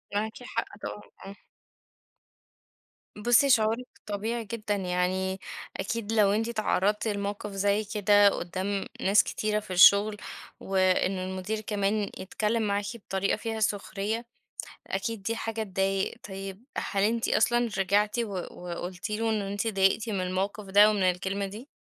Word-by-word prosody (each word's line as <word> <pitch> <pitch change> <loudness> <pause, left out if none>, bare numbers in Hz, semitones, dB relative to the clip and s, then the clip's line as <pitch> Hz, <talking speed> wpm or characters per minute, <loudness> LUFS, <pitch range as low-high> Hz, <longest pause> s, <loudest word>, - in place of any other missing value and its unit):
معاكِ 220 +4 -2
حق، 230 -4 -4
طبعًا، 210 - -5 0.2
آه. 200 +1 -8 1.8
بُصّي، 240 +6 +4
شعورِك 230 +1 +3 0.2
طبيعي 220 +3 -3
جدًا، 215 -2 -2
يعني 190 0 -1 0.4
أكيد 220 +2 -3
لو 205 -3 +4
أنتِ 225 +3 0
اتعرضتِ 210 -1 +1
لموقف 205 0 -3
زي 200 +2 +1
كده 205 -1 +4
قدَّام 190 +3 -3 0.2
ناس 195 +2 +5
كتيرة 215 0 -1
في 205 -3 -7
الشغل، 200 +3 +7 0.4
وإنه 185 0 +1
المدير 190 +3 -3
كمان 210 0 0
يتكلِّم 215 +4 -1
معاكِ 205 -1 0
بطريقة 195 -3 -1
فيها 225 0 -4
سخرية، 210 +2 -1 0.6
أكيد 200 +2 -3
دي 230 +3 -1
حاجة 225 -1 -3
تضايق. 195 0 0 0.2
طيب، 195 +2 -7
هل 195 0 0
أنتِ 225 +2 +1
أصلًا 240 +1 +3
رجعتِ 205 +4 +2
و 225 -3 -2 0.2
وقلتِ 180 +2 -6
له 225 +1 0
إن 215 -2 +1
أنتِ 200 +2 -3
اتضايقتِ 205 +1 +2
من 195 -3 -1
الموقف 195 +3 -2
ده 205 +2 +6
ومن 205 -3 +1
الكلمة 190 +2 0
دي؟ 215 +7 -8
205 Hz, 140 wpm, -28 LUFS, 195-220 Hz, 1.8 s, الشغل